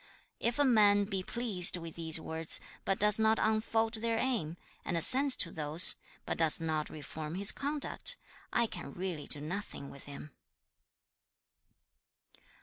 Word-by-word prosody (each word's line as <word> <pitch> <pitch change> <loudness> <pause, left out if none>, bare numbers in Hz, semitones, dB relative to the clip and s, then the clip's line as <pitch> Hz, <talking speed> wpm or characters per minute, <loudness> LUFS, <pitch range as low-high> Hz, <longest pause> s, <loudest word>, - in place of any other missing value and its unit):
If 235 +3 -3
a 290 - +1
man 205 -5 +2
be 195 -2 -4
pleased 195 -4 0
with 165 -2 -10
these 165 -1 0
words, 160 0 -2 0.3
but 195 - -1
does 210 +1 +4
not 220 0 +1
unfold 220 +1 -2
their 230 0 -2
aim, 220 -11 -4 0.3
and 170 - -4
assents 260 - +6
to 170 - +2
those, 155 +2 +6 0.3
but - - -6
does 160 -2 +2
not 155 -2 -4
reform 155 +2 -9
his 200 +2 +7
conduct, 295 - -1 0.4
I 235 - 0
can - - -9
really 175 -5 -7
do 145 - -1
nothing 165 -3 -8
with 140 - -15
him.' 145 +1 -12
190 Hz, 145 wpm, -30 LUFS, 160-225 Hz, 0.4 s, his